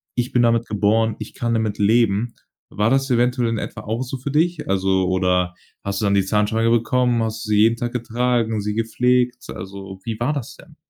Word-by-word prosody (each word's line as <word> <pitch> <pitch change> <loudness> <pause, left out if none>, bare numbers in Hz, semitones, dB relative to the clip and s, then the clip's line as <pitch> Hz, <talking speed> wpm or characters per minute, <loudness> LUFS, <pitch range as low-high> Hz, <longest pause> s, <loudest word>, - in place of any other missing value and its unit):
Ich 125 0 -1
bin 125 - +3
damit 115 -1 +3
geboren. 110 +1 +1
Ich - - -8
kann 115 -1 -1
damit 110 -2 -1
leben.“ 110 +1 +2 0.4
War 105 +2 +1
das 135 +1 +1
eventuell 125 0 +2
in 115 -1 -1
etwa - - -6
auch 110 +3 -3
so 130 +1 -4
für 130 +3 -5
dich? 160 +2 0
Also 95 -1 +1
oder 90 -1 +1 0.3
hast 100 +1 -3
du - - 0
dann 100 0 +2
die 100 -1 +2
Zahnspange 110 +3 +1
bekommen? 120 +1 +2
Hast 110 0 -3
du - - -8
sie 105 - +3
jeden 115 +1 +4
Tag 120 +1 -3
getragen, 120 -1 0
sie 105 +1 -2
gepflegt? 125 +2 0
Also, 95 +1 -8
wie 115 -2 -4
war 120 +5 0
das 140 -6 -5
denn? - - -17
115 Hz, 210 wpm, -21 LUFS, 105-120 Hz, 0.4 s, jeden